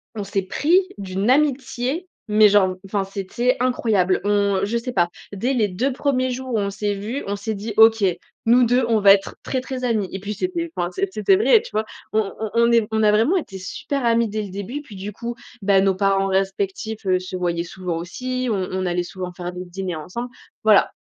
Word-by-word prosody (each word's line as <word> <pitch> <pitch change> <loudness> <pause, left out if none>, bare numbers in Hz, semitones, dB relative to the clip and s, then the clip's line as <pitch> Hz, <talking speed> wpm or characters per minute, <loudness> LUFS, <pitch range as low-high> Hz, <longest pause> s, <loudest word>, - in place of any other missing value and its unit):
on 210 - -3
s'est 195 0 -1
pris 315 - +3 0.2
d'une 195 +2 -2
amitié, 275 +3 +1 0.2
mais 210 0 +6
genre, 190 -2 +3
enfin 195 0 -1
c'était 200 +6 -1
incroyable. 220 -7 +2
On 200 -1 +2
je 215 +4 0
sais 235 +2 -4
pas. 175 -6 +2 0.2
Dès 235 +7 -1
les 225 -5 +2
2 250 +9 -1
premiers 255 -1 0
jours 255 0 -5
où - - +2
on 200 -1 -1
s'est 205 +1 -2
vues, 215 +8 -4
on 200 - -1
s'est 220 +2 -3
dit: 210 +2 -5
«OK, 225 -1 +6 0.4
nous 240 +2 +5
2, 245 +1 +3
on 225 -1 +3
va 200 -1 +8
être 195 0 -1
très, 260 - -1
très 255 0 -6
amies», 215 -6 0
et 190 - -5
puis 205 +2 -4
c'était, 340 - -3
enfin 175 - -1
c'est 195 +1 -2
c'était 215 - +3
vrai, 440 +2 +5
tu 470 - -11
vois? 215 +1 -1 0.3
On 215 -2 +1
on 220 - -2
on 235 0 +4
est 230 -2 +3
on 220 0 +1
a 210 - +5
vraiment 230 - +3
été 195 - -5
super 255 +8 -4
amies 230 0 +3
dès 215 +1 -3
le 200 - -7
début, 200 +8 -5
et - - -8
puis, 230 -8 -13
du 195 +2 -6
coup, 235 +3 -5 0.3
bah, 195 -1 +4
nos 195 -1 +2
parents 195 0 +2
respectifs, 195 +3 -2
heu, 185 -1 +2
se 185 0 -7
voyaient 170 -1 -1
souvent 175 -1 -4
aussi. 255 +9 -3
On 190 -3 -1
on 185 0 -2
allait 175 0 0
souvent 180 0 -6
faire 175 0 -5
des 180 +1 -6
dîners 180 0 -4
ensemble. 185 +11 -6 0.3
Voilà. - - +5
210 Hz, 225 wpm, -22 LUFS, 190-245 Hz, 0.4 s, va